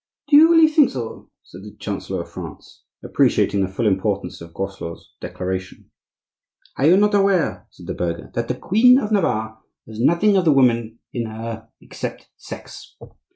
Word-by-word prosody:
"Do 295 - +5
you 315 +3 +8
really 325 -1 +6
think 310 -3 +4
so?" 120 -4 -7
said - - -13
the - - -12
chancellor - - -4
of - - -18
France, - - -11 0.2
appreciating 100 - +1
the 95 - +1
full 95 +5 -3
importance 100 -1 -1
of 85 0 -11
Groslot's 85 -3 -7
declaration. 95 0 -6 0.8
"Are 140 - +2
you 180 +3 +6
not 210 +1 +3
aware," 195 -4 +1
said - - -15
the - - -4
burgher, 85 -1 -4
"that 120 0 -2
the 125 - -2
Queen 240 - +4
of 220 -6 -2
Navarre 110 - 0 0.3
has 110 0 -10
nothing 170 - +3
of 185 - +1
the 155 - +5
woman 115 -4 +2 0.2
in 120 -2 -3
her 110 0 -7
except - - -8
sex? - - -11
120 Hz, 170 wpm, -21 LUFS, -, 0.8 s, you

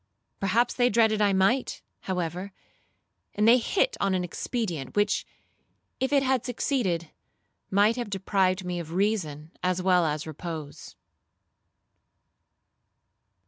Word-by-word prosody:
Perhaps 225 +5 +2
they 245 -1 +3
dreaded 220 -1 +3
I 205 -1 +4
might, 195 +7 +1 0.2
however, 180 +1 -3 0.8
and 210 +1 +2
they 240 +2 +7
hit 470 - +1
on 195 -1 +2
an 180 - 0
expedient, 175 - -4
which, 205 0 +1 0.7
if 265 +1 0
it 280 -1 +4
had 260 -2 +1
succeeded, 220 - -1 0.6
might 205 +4 +3
have 240 -4 -3
deprived 190 -1 0
me 180 -1 -3
of 165 -1 -7
reason 170 -6 -1
as 180 0 0
well 180 -1 +3
as 150 0 -2
repose. 155 -1 -7
195 Hz, 120 wpm, -27 LUFS, 175-230 Hz, 0.8 s, they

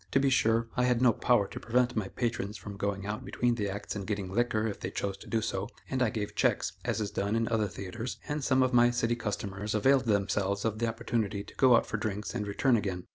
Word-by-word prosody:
To 135 - +5
be 135 0 +2
sure, 115 -2 +3
I 125 - +2
had 125 -1 +2
no 125 -2 +5
power 110 -4 +2
to 125 +3 -7
prevent 125 +1 +1
my 105 -4 -1
patrons 110 -2 -2
from 100 +2 -8
going 100 0 -2
out 105 +1 -4
between 120 -1 0
the 105 -4 -2
acts 100 +2 -5
and 100 -2 -5
getting 100 -3 -3
liquor 110 -1 +1
if 105 -3 -3
they - - -3
chose 100 0 -3
to - - -13
do 110 -1 0
so, 100 -2 -2 0.2
and 130 -1 0
I 125 - +4
gave 105 -1 -4
checks, - - +1
as - - -1
is 105 -1 -2
done 100 +1 -1
in 115 0 +1
other 110 -2 +1
theatres, 100 +6 -6
and 150 -1 -2
some 130 -1 +3
of 130 0 0
my 120 0 +6
city 120 -1 0
customers 105 -2 -3
availed 130 +4 +4
themselves 100 -1 0
of 110 -1 -1
the 115 - +1
opportunity 110 -2 -2
to - - -14
go 130 -2 +5
out - - +3
for - - -3
drinks 105 -1 -3
and 105 - -3
return 120 +5 +2
again. 95 -4 -3
110 Hz, 250 wpm, -30 LUFS, 100-120 Hz, 0.2 s, my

